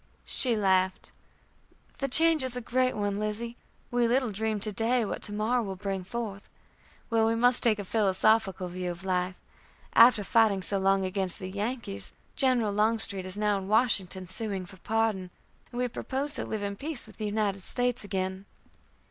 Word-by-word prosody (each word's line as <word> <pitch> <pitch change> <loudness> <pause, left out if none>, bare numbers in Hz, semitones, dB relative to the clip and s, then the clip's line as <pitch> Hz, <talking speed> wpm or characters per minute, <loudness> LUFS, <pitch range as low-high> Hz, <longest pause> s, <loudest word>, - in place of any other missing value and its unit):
She 240 -4 +6
laughed: 190 -2 +1 0.9
"The 275 - -1
change 320 +3 +4
is 255 -1 -3
a - - -2
great 255 +2 0
one, 205 -1 -1
Lizzie; 215 +3 -4 0.4
we 240 -1 +2
little 250 -1 +1
dream 215 +1 -2
to 215 - -1
day 230 +3 +1
what - - -5
to - - -1
morrow 220 +4 0
will 195 -4 -5
bring 195 -1 -4
forth. 205 -1 -6 0.6
Well, 225 -1 +3
we 225 - +1
must 245 +2 +3
take 220 -3 +2
a 205 - -5
philosophical 195 -1 +1
view 180 0 -4
of 175 +2 -7
life. 180 0 -1 0.6
After 230 -2 +6
fighting 210 -3 +2
so 200 +1 +3
long 195 0 +2
against 185 -1 -1
the 185 0 -7
Yankees, 205 - -3 0.2
General 245 -6 +2
Longstreet 210 -3 +1
is 185 +2 -7
now 210 -1 +1
in 190 - -8
Washington, 200 -4 +1
sueing 190 0 -4
for 190 - -14
pardon, 215 -3 -1 0.4
and 240 - -8
we 250 0 0
propose 275 +4 -4
to - - -1
live 215 -2 -4
in 200 0 -4
peace 295 0 -5
with - - -15
the 215 - -3
United 205 -2 -1
States 245 +4 +2
again." 190 -1 -4
210 Hz, 180 wpm, -28 LUFS, 190-235 Hz, 0.9 s, She